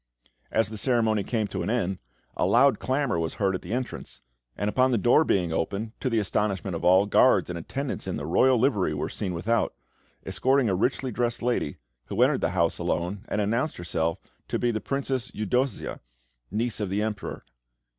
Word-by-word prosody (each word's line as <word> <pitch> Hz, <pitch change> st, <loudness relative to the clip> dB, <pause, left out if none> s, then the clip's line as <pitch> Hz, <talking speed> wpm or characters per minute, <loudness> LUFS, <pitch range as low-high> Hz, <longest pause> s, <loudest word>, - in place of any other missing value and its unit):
As 110 Hz, -2 st, +1 dB
the 110 Hz, -1 st, -5 dB
ceremony 110 Hz, -5 st, +2 dB
came 110 Hz, +1 st, -1 dB
to 95 Hz, -, -3 dB
an 85 Hz, -, -2 dB
end, 95 Hz, -6 st, 0 dB, 0.4 s
a -, -, +1 dB
loud 135 Hz, +3 st, +4 dB
clamour 130 Hz, -8 st, 0 dB
was 80 Hz, 0 st, -2 dB
heard 100 Hz, -2 st, +1 dB
at 95 Hz, -, -3 dB
the -, -, -8 dB
entrance, 125 Hz, +1 st, -4 dB, 0.4 s
and 100 Hz, -, -1 dB
upon 130 Hz, +5 st, +3 dB
the 120 Hz, -, +2 dB
door 120 Hz, +9 st, +5 dB
being 90 Hz, -, +1 dB
opened, 100 Hz, +7 st, -2 dB
to 130 Hz, -, -1 dB
the 115 Hz, -, 0 dB
astonishment 100 Hz, -2 st, 0 dB
of -, -, -5 dB
all, 95 Hz, +3 st, +5 dB
guards 100 Hz, -, +4 dB
and 85 Hz, -, -4 dB
attendants 135 Hz, -, -4 dB
in 95 Hz, -, -2 dB
the 70 Hz, -, -5 dB
royal 125 Hz, +11 st, +4 dB
livery 105 Hz, -, +1 dB
were 75 Hz, -, -2 dB
seen 95 Hz, -3 st, -3 dB
without, 110 Hz, +7 st, 0 dB, 0.5 s
escorting 130 Hz, -2 st, +2 dB
a -, -, +1 dB
richly 125 Hz, +6 st, 0 dB
dressed 120 Hz, +1 st, -1 dB
lady, 120 Hz, -11 st, 0 dB, 0.3 s
who -, -, -5 dB
entered -, -, +2 dB
the -, -, +1 dB
house 85 Hz, -1 st, +2 dB
alone, 90 Hz, +3 st, -2 dB
and 105 Hz, -, -1 dB
announced 115 Hz, +9 st, 0 dB
herself 85 Hz, -1 st, -1 dB, 0.3 s
to -, -, -1 dB
be 120 Hz, -, +1 dB
the 110 Hz, -2 st, -3 dB
Princess 135 Hz, -2 st, -2 dB
Eudossia, 125 Hz, +3 st, -1 dB, 0.5 s
niece 110 Hz, +3 st, -2 dB
of 105 Hz, -3 st, -2 dB
the 100 Hz, +3 st, 0 dB
Emperor. 110 Hz, -2 st, -4 dB
105 Hz, 195 wpm, -26 LUFS, 95-125 Hz, 0.5 s, door